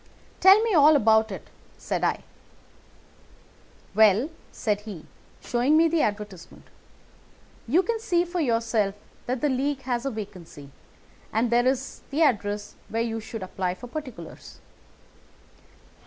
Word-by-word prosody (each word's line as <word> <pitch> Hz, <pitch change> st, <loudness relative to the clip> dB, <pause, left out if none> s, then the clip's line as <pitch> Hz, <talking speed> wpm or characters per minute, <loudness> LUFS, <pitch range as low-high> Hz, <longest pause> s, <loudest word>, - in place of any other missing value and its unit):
"'Tell 385 Hz, +2 st, +8 dB
me 455 Hz, -2 st, 0 dB
all 305 Hz, -1 st, +7 dB
about 220 Hz, -4 st, +4 dB
it,' 190 Hz, -, -9 dB, 0.3 s
said -, -, -3 dB
I. -, -, 0 dB, 1.7 s
"'Well,' 220 Hz, -, +4 dB, 0.2 s
said 210 Hz, -3 st, -1 dB
he, 205 Hz, -7 st, -9 dB, 0.4 s
showing 255 Hz, +5 st, +2 dB
me 330 Hz, +1 st, +5 dB
the 325 Hz, -1 st, +1 dB
advertisement, 205 Hz, -4 st, -4 dB, 1.0 s
'you 330 Hz, +11 st, +3 dB
can 460 Hz, +1 st, -1 dB
see 350 Hz, -5 st, +1 dB
for 350 Hz, +1 st, -4 dB
yourself 230 Hz, -7 st, 0 dB, 0.3 s
that 255 Hz, 0 st, -2 dB
the 295 Hz, -, +2 dB
League 270 Hz, +1 st, -1 dB
has 245 Hz, -2 st, -2 dB
a 275 Hz, -, -1 dB
vacancy, 180 Hz, -, -9 dB, 0.6 s
and 230 Hz, +2 st, 0 dB
there 240 Hz, +1 st, +3 dB
is 265 Hz, +1 st, -2 dB
the 300 Hz, +4 st, +1 dB
address 205 Hz, -6 st, 0 dB, 0.2 s
where 225 Hz, +1 st, -1 dB
you 225 Hz, -1 st, -3 dB
should 220 Hz, -1 st, -7 dB
apply 185 Hz, -1 st, -3 dB
for 245 Hz, -, -10 dB
particulars. 245 Hz, -, -9 dB
235 Hz, 135 wpm, -25 LUFS, 210-290 Hz, 1.7 s, Tell